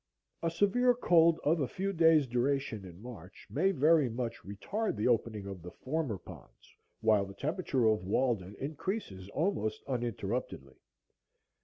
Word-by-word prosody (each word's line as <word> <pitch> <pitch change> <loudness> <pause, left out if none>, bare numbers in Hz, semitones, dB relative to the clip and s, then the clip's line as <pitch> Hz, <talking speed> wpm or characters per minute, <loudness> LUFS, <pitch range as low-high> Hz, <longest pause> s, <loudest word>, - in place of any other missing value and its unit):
A 165 - +1
severe 240 +8 +3
cold 170 -7 +4
of 160 +3 +2
a 140 - 0
few 195 +7 -3
days' 160 -3 +5
duration 125 -3 -1
in 90 +3 -12
March 105 -7 -11
may 160 - +2
very 155 -4 +4
much 115 0 -3
retard 190 - -3
the 105 +2 0
opening 115 -4 0
of 95 -2 -7
the 90 - -8
former 135 - -3
ponds, - - -14 0.3
while 110 -3 +4
the 100 0 -11
temperature 140 - -1
of 110 -4 +3
Walden 105 -2 0
increases 140 - -4
almost 125 - -1
uninterruptedly. 120 - -4
125 Hz, 145 wpm, -32 LUFS, 105-165 Hz, 0.3 s, days